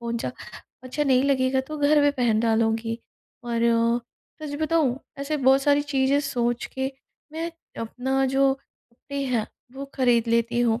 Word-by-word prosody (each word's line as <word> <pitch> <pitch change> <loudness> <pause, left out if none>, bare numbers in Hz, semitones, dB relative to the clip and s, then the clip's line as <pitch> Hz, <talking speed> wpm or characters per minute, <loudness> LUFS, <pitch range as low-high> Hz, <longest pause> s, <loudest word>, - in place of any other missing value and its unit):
कौन 235 0 -3
सा - - -3 0.5
अच्छा 265 +4 -2
नहीं 260 -2 +4
लगेगा 265 -1 +2
तो 305 - -3
घर 295 +1 +4
में 290 - +5
पहन 235 -5 +1
डालूँगी।" 225 0 +1 0.5
और 235 -1 -1 0.8
सच 290 -1 -5
बताऊँ? 310 -5 +1 0.2
ऐसे 280 +2 -2
बहुत 270 +1 +6
सारी 290 0 +3
चीज़ें 280 0 +1
सोच 240 -2 -1
के 265 +1 -2 0.4
मैं 330 +2 -3 0.3
अपना 265 +4 -1
जो 270 +1 +3
कपड़े 275 +1 -9
हैं 240 -5 0 0.3
वो 275 +1 -6
खरीद 240 -3 +2
लेती 235 +1 +1
हूँ 230 -1 +2
265 Hz, 155 wpm, -25 LUFS, 235-280 Hz, 0.8 s, बहुत